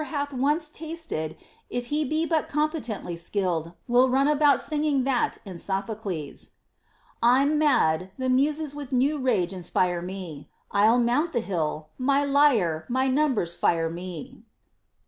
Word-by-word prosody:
173 285 -2 -3
hath 250 - -3
once 300 +3 +1
tasted, 315 - -5 0.3
if 245 0 -3
he 305 +1 +2
be 310 +3 0
but 320 -2 0
competently 295 - -2
skilled, 170 -2 -2
will 250 +1 +4
run 270 +2 +3
about 295 -2 +4
singing 295 -3 0
that 255 -2 0
in 185 -4 -8
Sophocles, 195 -5 -4 0.7
I'm 270 +6 +4
mad; 185 - +2
tlie 260 - -2
Mu^es 295 +2 +1
with 290 -2 -8
new 275 +4 +2
rage 195 -9 +1
inspire 180 -1 0
me. 175 -5 -7 0.2
I'll 215 +4 +4
mount 250 +8 +1
the 240 - +2
hill; 155 -7 -3
my 275 +2 +2
lyre, 245 - +3
my 260 +2 +1
numbers 260 - +1
fire 165 -1 +1
me. 185 +9 -8
250 Hz, 145 wpm, -26 LUFS, 180-290 Hz, 0.7 s, will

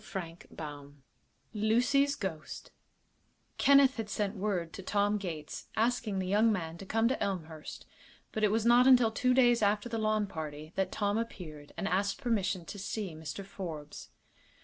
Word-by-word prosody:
CHAPTER 170 -4 -7
XIV 145 -2 -8 0.6
LUCY'S 245 +7 +2
GHOST 175 - -6 0.9
Kenneth 275 -1 +6
had 220 -2 -4
sent 205 0 -1
word 185 -5 -2
to - - -7
Tom 205 +2 +1
Gates, 165 -6 -6
asking 225 -2 0
the 190 - -1
young 210 +4 +3
man 165 -4 -3
to 195 - -9
come 225 +2 +2
to 255 - -1
Elmhurst, 160 -5 -4 0.5
but 215 - -3
it 210 - +5
was 220 +2 +1
not 240 +2 +6
until 250 -4 +6
two 250 +3 +2
days 240 -3 +5
after 205 +2 +2
the 225 -1 -2
lawn 215 -1 +1
party 155 -3 -7
that 190 -1 -1
Tom 205 +1 0
appeared 155 -10 -7
and 195 - -2
asked 195 +2 0
permission 200 -8 0
to 205 - -8
see 200 -2 -4
Mr. 155 +4 -7
Forbes. 160 -7 -7
200 Hz, 165 wpm, -31 LUFS, 170-225 Hz, 0.9 s, Kenneth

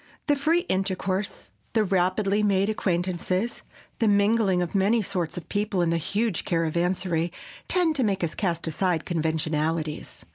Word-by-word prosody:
The 290 - +3
free 315 +5 +2
intercourse, 190 - -2 0.2
the 220 - +3
rapidly 195 +2 +1
made 200 0 +2
acquaintances, 185 +2 -1 0.4
the 225 - +3
mingling 200 -2 +3
of 175 -2 -2
many 210 +3 +3
sorts 180 -4 -3
of 175 - -6
peoples 205 -3 0
in 170 - +1
the 170 - +2
huge 205 +4 -1
caravansary—tend 175 - -1
to 260 - +2
make 195 -4 0
us 165 - -1
cast 175 -5 -1
aside 165 0 0
conventionalities. 160 -1 -2
190 Hz, 140 wpm, -26 LUFS, 170-210 Hz, 0.4 s, The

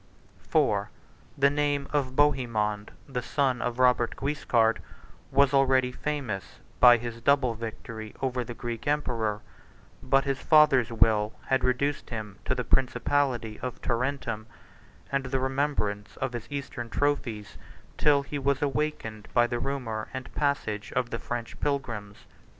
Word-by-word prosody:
IV. - - +2 0.5
The 140 0 +4
name 145 -1 0
of 130 -3 0
Bohemond, 115 -8 +1 0.2
the 130 -3 -3
son 130 0 0
of 120 -1 -2
Robert 125 -2 +3
Guiscard, 120 -5 +1 0.5
was 140 0 +4
already 130 -2 +4
famous 130 -9 -4 0.2
by 120 -1 +9
his 115 0 -6
double 140 -2 +3
victory 110 -1 -7
over 125 -1 -1
the 120 0 -7
Greek 120 0 -5
emperor; 115 -8 0 0.6
but 135 +1 +3
his 140 -1 -1
father's 145 -6 +5
will 110 -1 +3 0.2
had 130 0 +2
reduced 140 +3 0
him 105 -4 -6
to - - +1
the 125 - -2
principality 125 -3 +1
of 125 -1 -5
Tarentum, 120 -3 -2 0.6
and 135 -1 0
the 130 +1 -1
remembrance 130 -7 -1
of 130 -1 -2
his 120 -2 -5
Eastern 140 -4 -5
trophies, 120 -7 -1 0.4
till 145 -2 +4
he 145 +1 -4
was 140 +1 +1
awakened 135 -8 -2
by 120 -1 +6
the 120 0 -2
rumor 125 -6 -3
and 130 -1 -7
passage 110 -8 -1
of 125 -1 -1
the 115 - -2
French 120 -2 -5
pilgrims. 115 -8 -3
125 Hz, 140 wpm, -28 LUFS, 115-140 Hz, 0.6 s, by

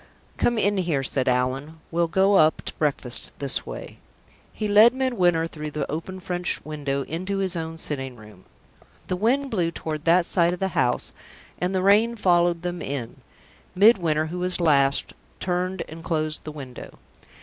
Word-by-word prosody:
"Come 240 - +1
in 205 -1 +1
here," 165 -7 0
said 130 0 0
Allan. 130 +5 -1
"We'll 170 0 +1
go 190 +3 +3
up 155 -5 +4
to - - -4
breakfast 140 -5 0
this 140 -2 +1
way." - - -8 0.5
He 215 - -3
led 215 +4 +6
Midwinter 185 -11 +1
through 155 -2 -6
the 150 -2 -4
open 170 +5 -5
French 180 0 -2
window 140 -2 -3
into 185 +7 -4
his 190 -2 0
own 165 -1 -4
sitting 135 -5 -3
room. 105 -4 -15 0.6
The 185 - 0
wind 260 +8 +1
blew 175 -6 +1
toward 155 -2 -5
that 170 +1 +4
side 170 -1 +2
of 180 - -6
the 190 - 0
house, 125 -7 0 0.5
and 180 +2 -1
the 185 - 0
rain 215 +4 +4
followed 175 -4 +2
them 175 0 -4
in. 135 -4 -5 0.6
Midwinter, 180 -7 +4
who 175 +3 -5
was 180 0 +2
last, 140 -4 +3 0.3
turned 180 +1 -2
and 165 +1 -10
closed 155 -2 -2
the 155 - -5
window. 135 -4 -10
170 Hz, 170 wpm, -24 LUFS, 150-185 Hz, 0.6 s, led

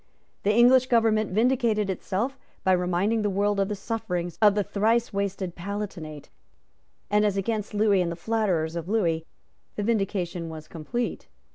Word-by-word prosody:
The 205 - +2
English 245 +3 +5
government 225 -3 +3
vindicated 225 -1 +2
itself 195 +7 -2 0.3
by 190 - +3
reminding 180 +5 +1
the 205 - +1
world 200 +1 +1
of 195 - +2
the 210 - -2
sufferings 180 -5 -3
of 205 -2 +6
the 205 - +2
thrice 220 +4 +1
wasted 195 -2 -2
Palatinate; 180 -6 -6 0.8
and, 210 0 +4
as 205 -2 +1
against 210 +1 -2
Lewis 205 -2 +3
and 170 -1 -1
the - - -4
flatterers 180 -5 0
of 170 +1 -4
Lewis, 170 -7 +1 0.5
the 205 - -2
vindication 195 -6 -1
was 155 -1 -9
complete. 180 +10 -4
200 Hz, 155 wpm, -26 LUFS, 180-220 Hz, 0.8 s, of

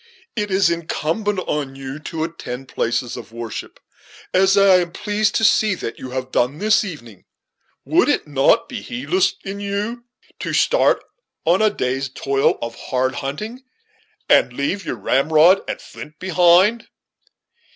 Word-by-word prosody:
It 210 -3 -2
is 190 -2 +3
incumbent 170 +5 -2
on 145 -5 -3
you 135 +1 -7
to 155 +1 -4
attend 135 -6 -6
places 120 +1 -1
of 120 - -8
public 115 +1 -13
worship, 115 -2 -6 0.5
as 190 +1 +4
I 195 -2 +6
am 175 -1 -3
pleased 210 0 0
to 225 - +1
see 210 -1 +3
that 115 - -6
you 130 - -7
have 130 0 -5
done 125 +4 +1
this 215 +3 +3
evening. 120 - -9 0.6
Would - - +3
it - - 0
not 145 - +3
be 255 -4 -6
heedless 350 +12 0
in 195 +1 -5
you 205 +4 -3 0.3
to - - -4
start - - +3 0.4
on 175 +5 +3
a 215 - +5
day's 135 -7 -2
toil 135 +1 0
of 115 0 -4
hard 130 +2 -2
hunting, 210 - -5 0.6
and - - +4
leave 145 +10 -2
your - - -3
ramrod 155 - +4
and - - -4
flint 150 0 -11
behind?" 185 +5 +3
170 Hz, 155 wpm, -20 LUFS, 135-205 Hz, 0.6 s, I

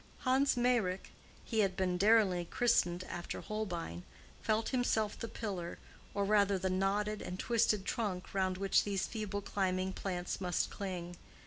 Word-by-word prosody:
Hans 265 +1 +3
Meyrick—he 230 -1 -1
had 195 -3 +2
been 185 -1 +1
daringly 195 -3 +4
christened 180 -5 +2
after 175 -1 -5
Holbein—felt 170 - -3
himself 225 -5 +1
the 230 - -3
pillar, 190 -7 -4 0.4
or 200 0 +1
rather 200 -1 +4
the 190 0 -1
knotted 205 +3 0
and 180 - -5
twisted 220 -4 +2
trunk, 200 -6 -2
round 190 -1 +1
which 195 0 +3
these 200 -2 -1
feeble 210 -3 -3
climbing 190 -1 -1
plants 180 -1 -3
must 180 -2 0
cling. 175 -3 -5
195 Hz, 135 wpm, -34 LUFS, 180-215 Hz, 0.4 s, daringly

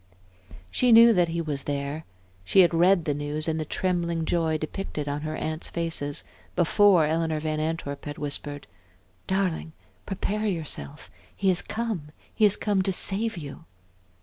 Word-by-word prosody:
She 250 -1 +3
knew 230 0 +9
that 175 -3 +3
he 170 0 -2
was 145 -4 -4
there. 145 +2 -3 0.4
She 190 - +5
had 175 -1 +4
read 175 0 +4
the 150 - +1
news 145 +2 -2
in 160 0 0
the 155 - -2
trembling 170 -1 -1
joy 160 -2 +1
depicted 155 -1 -5
on 145 +1 -2
her 155 0 -4
aunts' 155 +1 -3
faces, 165 -4 -2 0.3
before 180 0 +5
Eleanor 160 0 0
Van 155 0 -2
Antwerp 155 -3 -3
had 145 0 -6
whispered: 145 0 -4 0.6
"Darling, 185 -4 -1 0.3
prepare 210 +2 -2
yourself! 155 - -3 0.2
He 195 - +1
has 180 -2 +1
come 215 -10 -4 0.2
he 215 - +3
has 205 - +4
come 205 -3 0
to 195 - 0
save 205 +3 -1
you." 150 +1 -8
165 Hz, 160 wpm, -26 LUFS, 150-190 Hz, 0.6 s, knew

